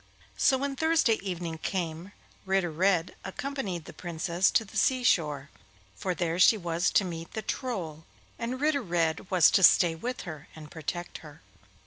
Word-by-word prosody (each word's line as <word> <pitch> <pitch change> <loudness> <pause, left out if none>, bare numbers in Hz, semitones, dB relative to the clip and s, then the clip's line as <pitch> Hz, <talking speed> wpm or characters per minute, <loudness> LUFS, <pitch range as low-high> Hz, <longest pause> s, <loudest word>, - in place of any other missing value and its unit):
So 265 - +3
when 275 +1 -3
Thursday 320 -6 +2
evening 175 -4 -4
came, 170 +1 -4 0.3
Ritter 190 -3 0
Red 180 +1 +1
accompanied 195 - -4
the - - -10
Princess 175 +1 0
to 225 - +1
the 195 - -15
sea 255 -1 +2
shore; 150 - +1 0.4
for 185 - -3
there 170 0 -1
she 215 +4 +6
was 170 -2 0
to 195 - +2
meet 165 -2 -7
the 220 - -4
Troll, 170 - -4 0.3
and 245 +2 -3
Ritter 295 -1 +1
Red 170 -3 -1
was 180 -4 +5
to - - +3
stay 175 -2 +6
with 245 +10 -5
her 155 -2 -8
and 155 -1 -11
protect 175 +2 -5
her. 150 0 -14
180 Hz, 165 wpm, -28 LUFS, 165-220 Hz, 0.4 s, she